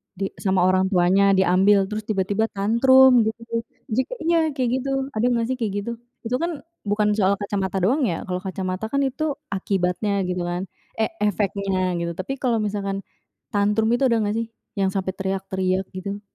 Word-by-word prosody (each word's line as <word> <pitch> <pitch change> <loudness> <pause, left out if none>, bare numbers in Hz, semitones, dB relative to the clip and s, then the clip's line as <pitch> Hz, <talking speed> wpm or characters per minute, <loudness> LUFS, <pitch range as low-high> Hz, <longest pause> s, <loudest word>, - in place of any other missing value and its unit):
di 195 +1 -3
sama 190 -2 +1
orang 185 +1 +3
tuanya 190 +2 +4
diambil 190 +2 +4
terus 215 0 -4
tiba-tiba 205 +2 0
tantrum 250 +5 +5
gitu, 230 +1 -4 0.3
jika 260 - 0
iya, 335 +1 +3 0.2
kayak 250 -2 0
gitu 275 +2 -4 0.2
ada 225 -3 0
gak 230 -1 +1
sih - - 0
kayak 215 -4 -1
gitu? 235 - -4 0.3
Itu 240 +2 -1
kan 335 -3 -3 0.3
bukan 210 +1 +2
soal 195 -1 +3
kacamata 200 -2 -2
doang 255 +5 +3
ya 165 - -2
kalau 180 -1 -3
kacamata 185 +1 -4
kan 280 +4 0
itu 285 +2 -1 0.2
akibatnya 190 +1 -1 0.2
gitu 180 - -2
kan, 175 +1 -2 0.3
e 220 - 0 0.2
efeknya 195 -3 0
gitu, 170 0 -2
tapi 190 +9 -4
kalau 240 -3 +1
misalkan 200 -1 -2 0.5
tantrum 210 +2 +2
itu 240 +3 +2
ada 230 -1 +2
gak 205 +1 -1
sih, 230 - -3 0.3
yang 195 - +3
sampai 190 -1 -1
teriak-teriak 190 -1 -1
gitu? 200 +2 -5
200 Hz, 175 wpm, -23 LUFS, 190-230 Hz, 0.5 s, tantrum